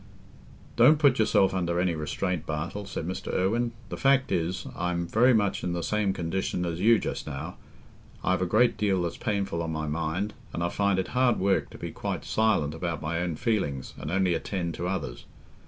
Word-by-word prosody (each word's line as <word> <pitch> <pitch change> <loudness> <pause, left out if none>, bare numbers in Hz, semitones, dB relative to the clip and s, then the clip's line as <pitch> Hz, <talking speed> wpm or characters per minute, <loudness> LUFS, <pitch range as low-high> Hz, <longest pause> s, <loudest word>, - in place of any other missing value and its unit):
"Don't 130 +6 +7
put 145 -5 +4
yourself 95 -3 +4
under 85 -2 0
any 90 -1 +2
restraint, 80 +2 -2
Bartle," 85 +6 -4
said 85 -4 -4
Mr. 95 - -4
Irwine. 115 +6 +1 0.2
"The - - -5
fact 135 0 +3
is, 85 +1 -1
I'm 90 0 -1
very 115 +9 +4
much 105 -4 +1
in 90 - -1
the 85 -1 -2
same 105 0 +1
condition 90 0 -2
as 85 -1 -3
you 115 +4 +6
just - - -4
now; 75 +4 -6 0.7
I've 95 +1 +1
a 90 - +1
great 115 +6 +3
deal 95 -4 +1
that's 85 - -3
painful 100 -6 -1
on 80 -1 -3
my 80 -1 -2
mind, 85 +7 -2 0.2
and 85 - -2
I 85 - +1
find 100 0 +1
it 95 - -1
hard 125 -1 +3
work 95 +1 +1
to - - -11
be - - -5
quite - - -4
silent 105 -10 +1
about 85 0 -3
my 85 +2 -2
own 90 -2 -1
feelings 95 - -1
and - - -6
only 95 0 +2
attend 85 -1 -2
to 85 - -3
others. 90 -10 -4
90 Hz, 200 wpm, -27 LUFS, 85-105 Hz, 0.7 s, Don't